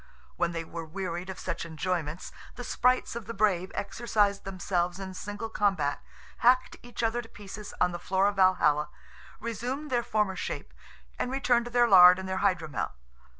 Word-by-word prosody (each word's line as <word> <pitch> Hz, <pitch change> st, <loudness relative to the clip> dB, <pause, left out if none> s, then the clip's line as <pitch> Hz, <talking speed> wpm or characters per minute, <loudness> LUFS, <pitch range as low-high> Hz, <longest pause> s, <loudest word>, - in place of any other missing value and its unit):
When 170 Hz, -, 0 dB
they 165 Hz, -1 st, -3 dB
were 165 Hz, 0 st, -7 dB
wearied 175 Hz, +2 st, -5 dB
of 190 Hz, -, -6 dB
such -, -, -4 dB
enjoyments, 165 Hz, 0 st, -3 dB, 0.2 s
the 245 Hz, -, -7 dB
sprites 250 Hz, 0 st, +1 dB
of 235 Hz, -3 st, -6 dB
the 230 Hz, -, -5 dB
Brave 190 Hz, -3 st, +1 dB
exercised 205 Hz, -1 st, 0 dB
themselves 180 Hz, -1 st, -1 dB
in 190 Hz, -1 st, -6 dB
single 205 Hz, +4 st, -5 dB
combat, 195 Hz, -10 st, 0 dB, 0.4 s
hacked 255 Hz, +2 st, +3 dB
each 240 Hz, -1 st, -6 dB
other 230 Hz, +1 st, +1 dB
to 225 Hz, -, -14 dB
pieces 205 Hz, +1 st, -9 dB
on 180 Hz, -, +3 dB
the 175 Hz, -, -5 dB
floor 190 Hz, +2 st, +1 dB
of 205 Hz, -1 st, -1 dB
Valhalla, 170 Hz, -5 st, +3 dB, 0.5 s
resumed 250 Hz, +6 st, -4 dB
their 240 Hz, -1 st, +2 dB
former 210 Hz, -4 st, 0 dB
shape, -, -, -5 dB, 0.5 s
and -, -, -1 dB
returned 250 Hz, -3 st, +2 dB
to 240 Hz, -, -7 dB
their 240 Hz, 0 st, +4 dB
lard 180 Hz, -3 st, +9 dB
and 190 Hz, 0 st, -5 dB
their 190 Hz, 0 st, -2 dB
hydromel. 180 Hz, -7 st, 0 dB
195 Hz, 175 wpm, -28 LUFS, 180-230 Hz, 0.5 s, lard